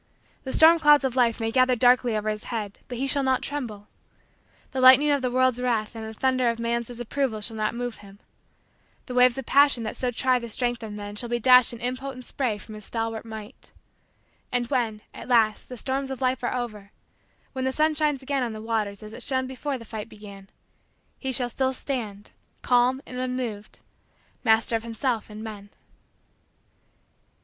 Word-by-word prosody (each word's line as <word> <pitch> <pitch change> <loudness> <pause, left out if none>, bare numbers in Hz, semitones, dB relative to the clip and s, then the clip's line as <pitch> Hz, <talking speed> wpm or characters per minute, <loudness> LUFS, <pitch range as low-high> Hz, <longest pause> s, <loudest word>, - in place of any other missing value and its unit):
The 265 - -3
storm 330 +3 +7
clouds 295 -2 +6
of 260 -2 -1
life 240 -3 +2
may 225 0 -1
gather 255 +1 +4
darkly 245 -1 +3
over 210 0 -3
his 215 0 -4
head 210 -4 -5
but 245 - -6
he 265 - -1
shall 280 +1 +2
not 260 -1 +1
tremble. 230 -8 -5 0.8
The 265 - -2
lightning 260 +3 +8
of 285 -1 +2
the 255 - 0
world's 255 0 +2
wrath 230 -3 -1
and 225 - -6
the 220 - -6
thunder 255 +1 +1
of 230 - -2
man's 235 0 -1
disapproval 245 0 -2
shall 220 +1 -2
not 215 +1 -1
move 245 -1 -4
him. 200 -1 -15 0.9
The 250 - -7
waves 250 0 +5
of 270 - -5
passion 280 -3 +4
that 215 - -4
so 250 - -1
try 255 +1 +1
the 235 -1 -7
strength 240 +1 -1
of 220 -2 -7
men 205 0 -7
shall 240 +2 -2
be 240 - 0
dashed 250 +1 +6
in 235 - -8
impotent 255 +1 -4
spray 245 -7 -2
from 215 +2 -11
his 210 -1 -9
stalwart 225 -1 -3
might. 220 -2 -9 0.8
And 245 -1 0
when, 225 -5 0
at - - -10
last, 225 -4 +2
the 250 - -7
storms 270 +3 -2
of 265 - -5
life 255 -1 0
are 240 - -1
over 215 -5 -5 0.6
when 260 -1 -3
the 265 - +1
sun 310 +3 +2
shines 300 -3 0
again 275 0 -1
on 235 -3 -2
the 215 - -7
waters 215 -3 -2
as 215 0 -9
it - - -7
shone 260 -1 0
before 265 +2 -4
the 230 - -12
fight 220 0 -7
began 200 -2 -12 0.7
he 265 - -2
shall 245 -2 -1
still 265 +1 0
stand, 220 -7 -5 0.3
calm 250 +2 +2
and 250 - -7
unmoved, 250 -5 -4 0.6
master 225 0 +3
of 225 - -1
himself 230 0 -2
and 215 +1 -8
men. 205 -2 -8
245 Hz, 195 wpm, -25 LUFS, 220-260 Hz, 0.9 s, lightning